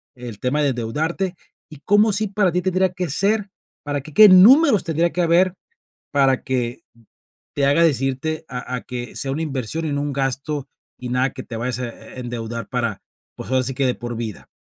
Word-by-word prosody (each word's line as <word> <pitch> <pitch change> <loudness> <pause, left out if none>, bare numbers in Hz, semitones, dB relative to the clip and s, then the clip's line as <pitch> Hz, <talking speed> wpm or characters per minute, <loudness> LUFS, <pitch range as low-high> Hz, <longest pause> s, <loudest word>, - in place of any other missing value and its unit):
el 120 -4 -9
tema 140 +4 0
de 145 - +3
endeudarte, 155 - -2 0.3
¿y 150 - -12
cómo 210 +6 +3
sí 215 +2 0
para 195 -2 +1
ti 180 - +1
tendría 185 0 +1
que 180 -3 -3
ser 200 +6 0 0.3
para 145 -1 -2
qué 155 +2 -13
qué 210 +6 +9
números 215 - +7
tendría 165 +1 +1
que 180 - -1
haber 175 +2 +3 0.6
para 135 -2 +2
que 125 -2 -2 0.7
te 140 - +1
haga 145 +4 +4
decirte 140 +1 0
a 125 0 -5
a 125 - -4
que 120 -1 -7
sea 135 - -2
una 145 +4 -2
inversión 150 +1 -3
y 150 - -2
no 145 - -1
un 145 -1 -3
gasto 135 +1 -2 0.3
y 125 -1 -6
nada 125 +1 +1
que 130 - -7
te 120 - -8
vayas 125 +1 -2
a 125 - -3
e 120 - -11
endeudar 115 -1 -5
para, 115 -5 -2 0.3
pues - - -9
ahora 130 0 +3
sí 130 +1 -3
que 135 0 0
de 125 - +2
por 120 0 -6
vida? 110 -3 -6
140 Hz, 205 wpm, -21 LUFS, 125-175 Hz, 0.7 s, qué